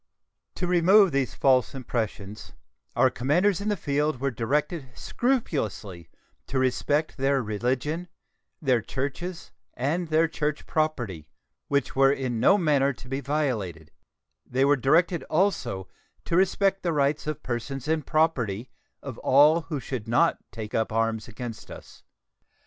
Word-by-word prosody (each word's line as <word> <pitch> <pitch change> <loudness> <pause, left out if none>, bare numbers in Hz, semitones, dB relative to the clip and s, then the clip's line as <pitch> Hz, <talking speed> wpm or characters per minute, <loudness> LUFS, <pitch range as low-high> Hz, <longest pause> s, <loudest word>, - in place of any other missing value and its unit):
To 180 - -2
remove 180 +2 +5
these 135 -2 -1
false 130 -1 +2
impressions, 110 -5 -5 0.4
our - - +4
commanders 170 - +1
in 210 - -1
the 205 - 0
field 145 -2 -1
were 140 +1 -1
directed 140 +5 -1
scrupulously 110 - -2 0.4
to 135 - -3
respect 145 +5 0
their 135 -1 +1
religion, 130 - -2 0.5
their 130 -6 +2
churches, 145 - -5 0.2
and 160 +8 -1
their 160 +1 +3
church 150 -1 -3
property, 120 - -2 0.4
which 140 -2 0
were 135 0 +5
in 130 -4 -2
no 195 - +5
manner 145 -6 +2
to 130 - -14
be 135 +2 -3
violated; 115 - -2 0.5
they 130 +2 +1
were 145 +1 +5
directed 165 +6 +2
also 155 - 0 0.4
to - - -1
respect 195 +1 +2
the 170 -2 -1
rights 145 +1 0
of 155 -2 -4
persons 130 +3 -4
and 155 -2 -1
property 130 - 0 0.3
of 130 -5 -7
all 150 +5 +5
who 150 -4 -2
should 125 -4 -5
not 165 +9 +2
take 110 -2 -7
up 110 -1 0
arms 110 0 -1
against 120 -1 -8
us. - - -12
140 Hz, 140 wpm, -26 LUFS, 120-160 Hz, 0.5 s, remove